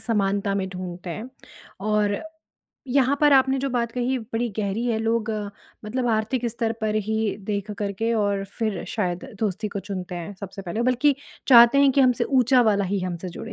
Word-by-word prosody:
समानता 200 Hz, -2 st, 0 dB
में 190 Hz, -1 st, -1 dB
ढूँढते 180 Hz, -1 st, -7 dB
हैं। 220 Hz, +8 st, -6 dB, 0.6 s
और 210 Hz, -1 st, +2 dB, 0.7 s
यहाँ 270 Hz, +2 st, +3 dB
पर 295 Hz, -1 st, +5 dB
आपने 265 Hz, 0 st, +4 dB
जो 275 Hz, 0 st, -2 dB
बात 235 Hz, -2 st, -1 dB
कही 250 Hz, +1 st, 0 dB
बड़ी 230 Hz, +1 st, -3 dB
गहरी 210 Hz, +3 st, -1 dB
है 225 Hz, -2 st, +1 dB
लोग 225 Hz, 0 st, 0 dB, 0.5 s
मतलब 245 Hz, +3 st, -2 dB
आर्थिक 225 Hz, +3 st, 0 dB
स्तर 230 Hz, 0 st, -1 dB
पर 215 Hz, 0 st, 0 dB
ही 220 Hz, -2 st, 0 dB
देख 205 Hz, 0 st, -2 dB
कर 200 Hz, -1 st, -2 dB
के 225 Hz, +4 st, -1 dB
और 200 Hz, -2 st, 0 dB
फ़िर 215 Hz, -6 st, -1 dB
शायद 180 Hz, -3 st, -2 dB, 0.2 s
दोस्ती 210 Hz, 0 st, -1 dB
को 200 Hz, -1 st, -4 dB
चुनते 185 Hz, -2 st, -6 dB
हैं 175 Hz, +3 st, -6 dB
सबसे 195 Hz, 0 st, -7 dB
पहले। 205 Hz, +6 st, -3 dB
बल्कि 255 Hz, +4 st, +3 dB, 0.3 s
चाहते 240 Hz, +2 st, +8 dB
हैं 280 Hz, -1 st, +6 dB
कि 280 Hz, -, +3 dB
हमसे 250 Hz, -2 st, +3 dB
ऊँचा 255 Hz, -1 st, +4 dB
वाला 205 Hz, -3 st, +2 dB
ही 195 Hz, +1 st, -1 dB
हम 180 Hz, -1 st, -3 dB
से 180 Hz, +2 st, -7 dB
जुड़े 225 Hz, +6 st, -8 dB
220 Hz, 190 wpm, -24 LUFS, 200-245 Hz, 0.7 s, चाहते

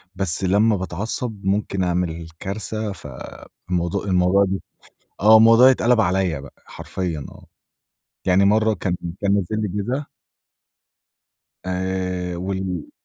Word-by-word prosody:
بس 95 Hz, -1 st, 0 dB
لمّا 105 Hz, +4 st, +3 dB
باتعصب، 100 Hz, +3 st, -4 dB
ممكن 100 Hz, -1 st, 0 dB
أعمل 85 Hz, -2 st, -2 dB
كارثة، 110 Hz, +2 st, -4 dB
فالموضوع 85 Hz, -1 st, -5 dB
الموضوع 95 Hz, +1 st, +3 dB, 0.8 s
آه، 110 Hz, +2 st, +8 dB
الموضوع 115 Hz, +4 st, +7 dB
يتقلب 125 Hz, -2 st, +3 dB
عليّا 90 Hz, -6 st, +1 dB
بقى، 70 Hz, -, -15 dB
حرفيًا 85 Hz, -6 st, -5 dB
آه. -, -, -15 dB, 0.8 s
يعني 95 Hz, +1 st, +4 dB
مرة 110 Hz, +2 st, +3 dB
كان 90 Hz, -2 st, -2 dB, 0.3 s
كان 100 Hz, 0 st, +2 dB
نازل 100 Hz, -3 st, +1 dB
لي 105 Hz, -, -1 dB, 0.2 s
جِزا 135 Hz, +6 st, -2 dB, 1.6 s
آآ 95 Hz, -, -4 dB, 0.7 s
وال 95 Hz, -2 st, -4 dB
95 Hz, 110 wpm, -22 LUFS, 90-110 Hz, 1.6 s, آه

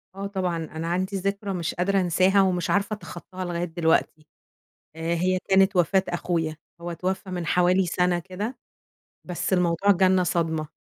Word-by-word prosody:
آه 200 Hz, 0 st, -4 dB
طبعًا، 185 Hz, -4 st, -2 dB
أنا 160 Hz, 0 st, -5 dB
عندي 185 Hz, +3 st, -1 dB
ذكرى 200 Hz, +1 st, -2 dB
مش 170 Hz, -2 st, -2 dB
قادرة 195 Hz, +2 st, +1 dB
أنساها 185 Hz, +3 st, +3 dB
ومش 180 Hz, -2 st, +1 dB
عارفة 200 Hz, +1 st, +1 dB
أتخطاها 185 Hz, -1 st, -8 dB
لغاية 175 Hz, -1 st, -2 dB
دلوقتي. 160 Hz, -2 st, 0 dB, 0.7 s
آآ 165 Hz, +1 st, -1 dB
هي 185 Hz, +2 st, +1 dB
كانت 195 Hz, +1 st, +4 dB
وفاة 185 Hz, +2 st, +3 dB
أخويا، 170 Hz, -2 st, -1 dB, 0.3 s
هو 175 Hz, 0 st, -4 dB
اتوفى 185 Hz, +3 st, -3 dB
من 180 Hz, -2 st, -3 dB
حوالي 180 Hz, +3 st, +3 dB
سنة 180 Hz, 0 st, +1 dB
كده، 205 Hz, +8 st, -5 dB, 0.7 s
بس 180 Hz, +1 st, -2 dB
الموضوع 180 Hz, +2 st, +3 dB
جالنا 185 Hz, -1 st, +4 dB
صدمة. 160 Hz, -3 st, -1 dB
180 Hz, 155 wpm, -25 LUFS, 170-190 Hz, 0.7 s, كانت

